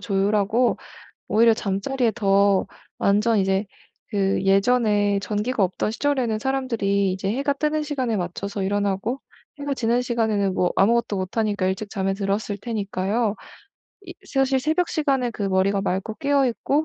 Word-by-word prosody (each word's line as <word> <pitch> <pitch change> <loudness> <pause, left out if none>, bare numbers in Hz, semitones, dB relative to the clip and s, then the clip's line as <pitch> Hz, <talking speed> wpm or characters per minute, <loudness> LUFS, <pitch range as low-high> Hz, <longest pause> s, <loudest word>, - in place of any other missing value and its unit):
조율하고 205 +4 +1 0.5
오히려 230 +1 +5
잠자리에 220 +4 -1
더 200 -3 +3 0.3
완전 210 +3 +2
이제 195 +1 +1 0.4
그 195 -3 0
예전에 205 0 +3
전기가 210 +4 -1
없던 185 +3 -2
시절에는 245 -2 0
사람들이 215 -7 0
이제 190 +1 -3
해가 275 +6 0
뜨는 305 +1 0
시간에 260 -7 -2
맞춰서 195 +2 -4
일어나고 205 +5 -1 0.4
해가 285 -1 -2
지는 240 0 +1
시간에는 220 -5 0
뭐 180 -1 +1
아무것도 230 +1 +2
못하니까 205 +1 -1
일찍 190 +2 -2
잠에 195 -2 -1
들었을 200 +1 -2
테니까요. 210 0 -1 0.7
이 350 - -8
사실 270 -3 +1
새벽 320 +5 +1
시간에 275 -6 0
그 215 - -6
머리가 195 +1 +1
맑고 195 +3 -2
깨어 280 -1 +2
있고 280 +5 0
215 Hz, 340 characters per minute, -23 LUFS, 195-250 Hz, 0.7 s, 오히려